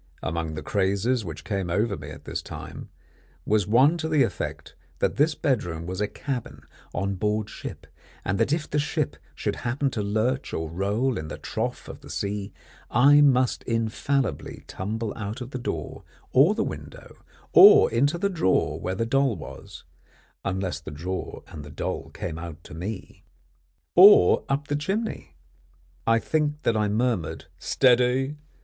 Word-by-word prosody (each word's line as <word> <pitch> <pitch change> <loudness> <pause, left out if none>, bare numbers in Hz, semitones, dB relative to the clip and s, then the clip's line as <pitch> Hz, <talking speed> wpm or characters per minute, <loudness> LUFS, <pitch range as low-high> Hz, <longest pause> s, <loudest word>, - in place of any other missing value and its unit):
Among 80 -1 -2
the 75 - -5
crazes 100 +5 +1
which 80 -3 -7
came 95 -4 -2
over 105 +4 +1
me 75 -3 -9
at 75 - -10
this - - -3
time, - - -9 0.6
was 105 -2 +2
one 135 +10 +4
to 160 0 -2
the 150 -3 +4
effect - - -4 0.2
that - - 0
this 150 +2 +3
bedroom 85 - -1
was 90 +3 -4
a 105 - +1
cabin 125 +3 -5 0.3
on 100 +2 -1
board 105 +2 -1
ship, - - -8 0.4
and 95 +2 0
that 115 +4 +2
if 155 0 0
the 150 - 0
ship 145 - -1 0.2
should - - -2
happen 130 +3 -1
to 110 - -2
lurch 110 +6 -1
or 80 -1 -3
roll 105 +8 0
in 80 - -6
the - - -6
trough - - -4
of - - -9
the - - -13
sea, 100 0 -3 0.4
I 140 +5 +6
must 130 -3 +3
infallibly 115 - -1
tumble 110 +3 -4
out 105 +1 -5
of 125 0 -7
the 130 - -4
door 120 - -5 0.3
or - - +5
the - - +1
window, - - -8 0.4
or - - +9
into 140 +8 +2
the 200 +3 +1
drawer 165 - +1
where 95 +1 -3
the 115 - -1
doll 135 0 +2
was 80 -6 -10 0.6
unless 95 -4 -2
the 80 - -9
drawer 90 +6 -5
and 75 - -9
the 75 - -10
doll - - -4
came 80 0 -5
out 85 -1 -8
to - - -12
me 95 +5 -7 0.7
or 185 - +8
up 140 +1 -1
the 145 - 0
chimney. 190 - -3 0.7
I 115 0 +5
think 150 +4 -1
that 115 - +2
I 105 -1 +2
murmured 110 -6 -1
"Steady!" 130 +2 +3
110 Hz, 170 wpm, -25 LUFS, 95-135 Hz, 0.7 s, or